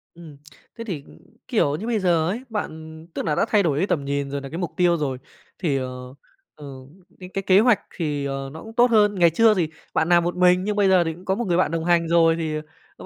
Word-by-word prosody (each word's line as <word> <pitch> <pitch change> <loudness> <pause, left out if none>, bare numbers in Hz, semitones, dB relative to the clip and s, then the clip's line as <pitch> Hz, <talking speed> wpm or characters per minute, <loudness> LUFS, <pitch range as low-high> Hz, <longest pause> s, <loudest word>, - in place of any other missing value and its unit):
Ừm, 160 -4 -13 0.4
thế 230 - -6
thì, 170 -11 -5 0.4
kiểu, 145 0 +1
như 215 +9 -6
bây 225 -3 0
giờ 170 -4 +1
ấy, 235 +6 -4
bạn 160 -6 -6
tức - - -4
là 150 -2 0
đã - - +2
thay 205 -2 +3
đổi 145 -4 0
cái 190 - 0
tầm 140 -3 -1
nhìn 140 0 -2
rồi 140 -1 -3
nà 135 - -8
cái 165 - -6
mục 175 -3 -3
tiêu 175 -1 +3
rồi, 135 -4 -2 0.4
thì, 150 -7 0
ờ, 125 0 -6 0.4
ờ, 150 - -12 0.5
cái 180 0 -10
cái 195 - -2
kế 190 0 +4
hoạch 225 -3 +4 0.2
thì, 150 -4 -2
ờ, 135 0 -4
nó 160 - -9
cũng 225 - -11
tốt 240 0 +3
hơn. 210 -2 +4
Ngày 170 -2 +5
chưa 220 +6 +4
thì 170 -5 -1 0.2
bạn 160 +2 +1
làm 170 -1 +4
một 175 +1 -2
mình 180 0 +3
nhưng 210 +1 -2
bây 205 -2 +3
giờ 185 -2 +5
thì 165 -1 -3
cũng 180 +3 -15
có 190 - 0
một 240 +1 -3
người 175 0 +1
bạn 175 -4 +1
đồng 165 0 -2
hành 170 -1 +2
rồi 165 -1 +4
thì, 160 -2 -3 0.4
ờ, - - -11
170 Hz, 260 wpm, -23 LUFS, 150-195 Hz, 0.5 s, Ngày